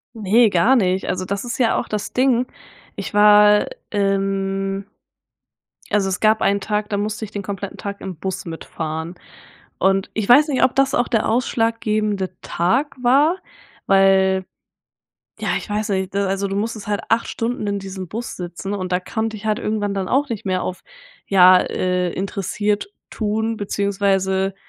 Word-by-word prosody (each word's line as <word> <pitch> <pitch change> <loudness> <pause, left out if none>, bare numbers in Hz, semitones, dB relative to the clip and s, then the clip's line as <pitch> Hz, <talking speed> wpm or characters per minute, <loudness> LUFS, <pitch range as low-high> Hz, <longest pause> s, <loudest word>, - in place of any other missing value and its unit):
Ne, 220 +2 +4
gar 205 +8 +4
nicht. 190 -5 +1
Also 185 0 -2
das 200 +1 -3
ist 240 - -4
ja 235 -3 +3
auch - - -2
das 210 -1 -4
Ding. 255 -1 +2 0.5
Ich - - -6
war, 210 0 +6 0.2
ähm, 195 -1 -1 1.0
also 200 -2 +1
es 190 - -2
gab 220 0 +3
einen 200 0 +2
Tag, 210 +1 -2
da 205 - -1
musste 215 +2 -3
ich 215 - -6
den 205 - -4
kompletten 200 0 -6
Tag 200 0 -6
im 185 -3 -6
Bus 190 +2 -4
mitfahren 160 0 -5 0.6
und 195 0 +2
ich 215 -2 -2
weiß 285 +5 +7
nicht, 270 - +1
ob 260 - +3
das 270 0 +2
auch 240 - +1
der 225 -3 +1
ausschlaggebende 215 -4 0
Tag 250 - 0
war, 285 +8 +4 0.5
weil 190 -1 +4 0.9
ja, - - -2
ich - - -8
weiß 210 +1 -2
nicht, 190 -1 -2
ne, 200 0 0
also 195 +1 -1
du 195 - -3
musstest 215 0 -3
halt 205 -1 -1
8 230 +1 +2
Stunden 230 -2 -3
in 200 0 -1
diesem 190 -1 -7
Bus 225 +6 -5
sitzen 180 +2 -5
und 185 -2 -4
da 180 - +2
konnte 220 +2 -3
ich 215 - -11
halt 215 -1 0
irgendwann 210 -2 -1
dann 195 -2 -2
auch 280 +3 +1
nicht 225 -2 -5
mehr 185 -1 0
auf, 185 - -5 0.5
ja, 185 -1 +7
äh, 180 -1 -1
interessiert 205 - -2 0.2
tun 220 +1 -1
beziehungsweise 195 -1 0
200 Hz, 170 wpm, -20 LUFS, 190-220 Hz, 1.0 s, weiß